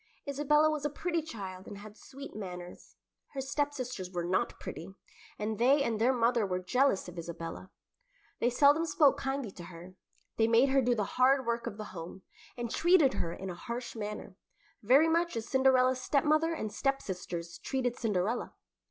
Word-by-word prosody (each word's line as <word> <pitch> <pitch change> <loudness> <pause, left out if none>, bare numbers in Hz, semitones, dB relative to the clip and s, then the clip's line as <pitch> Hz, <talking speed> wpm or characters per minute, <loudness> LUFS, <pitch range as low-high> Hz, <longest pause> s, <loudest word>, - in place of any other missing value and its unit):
Isabella 300 +2 +3
was 300 -2 -3
a 295 - 0
pretty 335 +3 -2
child 195 -10 -8
and 205 - -8
had 210 +1 -11
sweet 275 +3 -11
manners. 180 -3 -8 0.4
Her 275 - -4
stepsisters 265 -8 -3
were 175 -2 -3
not 180 +2 -1
pretty, 190 +4 -8 0.4
and 215 0 -3
they 275 +4 +4
and 225 -4 -1
their 245 +3 +5
mother 235 -2 +2
were 185 -2 -1
jealous 250 +3 +1
of 175 -1 -8
Isabella. 170 +2 -7 0.7
They 240 - +2
seldom 290 +6 +4
spoke 295 -2 +4
kindly 270 -5 -3
to 175 -2 -10
her; 175 +1 -11 0.4
they 225 - +4
made 235 +4 +5
her 270 0 +4
do 245 -1 +2
the 215 - 0
hard 260 +5 +3
work 235 0 -1
of 205 - -5
the 215 - -5
home, 175 +2 -8 0.3
and 240 -1 -4
treated 335 -6 +4
her 165 - -2
in 190 +2 -6
a - - -5
harsh 240 +7 -6
manner, 210 -3 -6 0.5
very 265 +9 +5
much 335 -3 +1
as 225 0 -4
Cinderella's 260 -1 +3
stepmother 310 +4 +2
and 220 -10 -4
stepsisters 180 -10 -3
treated 250 -3 -1
Cinderella. 215 +1 -1
240 Hz, 175 wpm, -31 LUFS, 190-275 Hz, 0.7 s, their